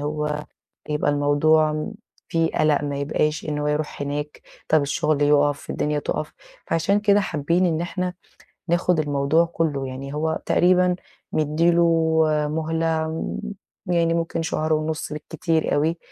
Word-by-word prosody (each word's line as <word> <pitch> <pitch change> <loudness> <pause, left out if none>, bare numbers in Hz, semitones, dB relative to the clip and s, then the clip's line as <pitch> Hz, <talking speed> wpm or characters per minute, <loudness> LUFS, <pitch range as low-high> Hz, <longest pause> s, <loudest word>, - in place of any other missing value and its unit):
هو 150 0 -2 0.4
يبقى 150 -1 +1
الموضوع 145 +2 +3
م 155 +6 -3 0.4
في 165 -1 +2
قلق 155 -1 +2
ما 145 -1 -3
يبقاش 150 +2 -1
إن 150 -1 -1
هو 150 - -1
يروح 150 -1 -2
هناك 145 +1 -4 0.3
طب 155 -1 +4
الشغل 150 +1 0
يُقف، 145 0 +2
الدنيا 150 0 -1
تُقف 150 +1 -3 0.3
فعشان 180 +5 +1
كده 205 0 +4
حابين 170 0 +1
إن 165 -2 0
إحنا 180 +1 -3 0.5
ناخُد 175 0 +2
الموضوع 145 +2 +2
كله، 155 -5 -2
يعني 135 +2 -7
هو 160 +1 -1
تقريبًا 180 0 +3 0.4
مِدّي 155 +3 +2
له 170 0 +4 0.7
مهلة 160 +1 -1 1.0
يعني 170 -1 +2
ممكن 165 0 -1
شهر 155 -1 -1
ونص 155 0 -2
بالكتير 160 +1 -1
أوي، 160 +4 +1
155 Hz, 140 wpm, -23 LUFS, 150-165 Hz, 1.0 s, طب